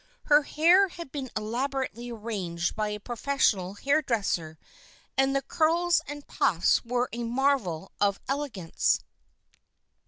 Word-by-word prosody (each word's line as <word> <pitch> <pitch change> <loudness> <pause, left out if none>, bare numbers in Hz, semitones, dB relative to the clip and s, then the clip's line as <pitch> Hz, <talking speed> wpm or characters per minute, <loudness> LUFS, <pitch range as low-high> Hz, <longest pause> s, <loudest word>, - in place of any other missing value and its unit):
Her 295 0 +5
hair 345 +7 +4
had 340 -6 -9
been 270 -3 -5
elaborately 245 +2 -3
arranged 200 -7 -3
by 215 -1 -1
a 210 0 -4
professional 220 -5 0
hair 280 +8 +2
dresser 195 - -1 0.6
and 270 +1 +2
the 275 - +1
curls 335 +4 +2
and 290 0 -7
puffs 175 0 +2
were 245 +1 0
a 235 0 -3
"marvel 235 - 0
of 200 -1 +2
elegance." 270 - 0
245 Hz, 125 wpm, -27 LUFS, 205-280 Hz, 0.6 s, Her